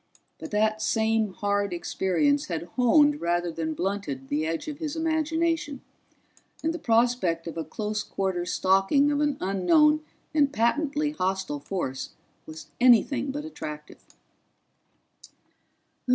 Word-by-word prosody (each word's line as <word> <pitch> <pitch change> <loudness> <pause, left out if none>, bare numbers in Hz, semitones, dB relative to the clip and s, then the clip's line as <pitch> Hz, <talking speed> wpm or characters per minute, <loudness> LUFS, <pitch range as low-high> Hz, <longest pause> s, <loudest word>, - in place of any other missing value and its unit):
But - - -7
that 215 +1 +1
same 220 -1 +1
hard 205 0 -1
experience 190 - 0
had 170 0 -4
honed 290 +4 +4
rather 175 0 0
than 160 -1 -3
blunted 175 -9 -3
the 155 +2 0
edge 165 - -3
of 300 0 -6
his 310 -2 -4
imagination, 320 -2 -1 0.8
and 325 +1 0
the 345 - -5
prospect 230 - +1
of 165 - -6
a 165 - -3
close 210 +2 -3
quarters 180 -3 -2
stalking 195 +10 +3
of 290 0 0
an 290 -2 +1
unknown 300 - +3 0.3
and 290 -3 +3
patently 295 +4 0
hostile 190 - -2
force 140 -4 -4 0.3
was 155 -1 -9
anything 250 +3 +4
but 295 +2 -5
attractive. 150 - -8
215 Hz, 125 wpm, -26 LUFS, 175-290 Hz, 0.8 s, honed